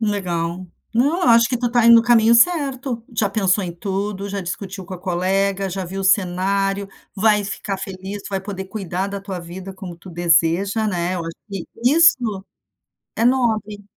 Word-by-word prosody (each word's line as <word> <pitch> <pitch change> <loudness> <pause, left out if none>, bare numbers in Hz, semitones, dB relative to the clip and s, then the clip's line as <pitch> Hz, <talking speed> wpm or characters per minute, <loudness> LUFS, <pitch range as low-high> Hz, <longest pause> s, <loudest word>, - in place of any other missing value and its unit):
Legal, 180 -4 -2 0.3
não, 285 +10 +1
eu - - +3
acho 230 0 +6
que 250 - 0
tu 240 -1 -1
tá 240 -1 +3
indo 235 - +9
no 230 - +5
caminho 235 -1 +5
certo. 270 -3 +2
Já 210 - +2
pensou 195 -1 +1
em 175 - -5
tudo, 195 +2 -3
já 200 0 -3
discutiu 190 +1 -6
com 190 - -7
a - - -8
colega, 195 +2 0
já 190 +1 -4
viu 190 +2 -5
o - - -3
cenário, 195 +1 +1 0.3
vai 210 0 +3
ficar 200 0 -4
feliz, 190 +2 -7
vai 195 -1 -2
poder 190 -1 -6
cuidar 190 -2 -3
da 200 0 -5
tua 195 -2 -6
vida 180 +3 -8
como 185 -3 -9
tu 180 +2 -13
deseja, 175 +5 +2
né. 180 -2 -1
Eu 180 - -3
acho 165 0 -6
que 195 -4 -5 0.2
isso 250 - +4 0.7
é 225 - +1
nobre. 220 -5 +1
195 Hz, 185 wpm, -20 LUFS, 185-220 Hz, 0.7 s, indo